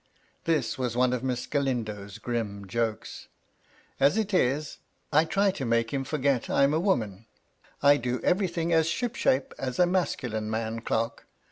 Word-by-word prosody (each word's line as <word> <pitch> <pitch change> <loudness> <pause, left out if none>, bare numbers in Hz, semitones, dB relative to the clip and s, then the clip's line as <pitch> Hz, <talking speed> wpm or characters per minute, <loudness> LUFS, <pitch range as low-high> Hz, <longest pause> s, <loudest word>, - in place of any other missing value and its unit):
This 150 -8 0
was 125 -2 -2
one 125 0 +3
of 125 0 -2
Miss 125 -2 -2
Galindo's 110 -8 -2
grim 105 -5 -3
jokes. 110 +2 -3 0.3
" - - -33
As 140 +9 +4
it 210 -2 -1
is, 150 -2 +1 0.3
I 155 +2 +5
try 195 +4 +2
to 170 -7 -5
make 115 -1 +1
him 135 -1 -1
forget 140 -4 0
I'm 140 +1 +3
a 155 - +2
woman, 110 - -1 0.6
I 145 0 +7
do 125 0 -2
everything 175 -3 +1
as 160 -1 +4
ship 240 +7 -1
shape 130 +1 +1
as 130 -2 -3
a 180 - +5
masculine 125 - -1
man 110 +1 -2
clerk. 115 0 -2
130 Hz, 165 wpm, -27 LUFS, 115-160 Hz, 0.6 s, I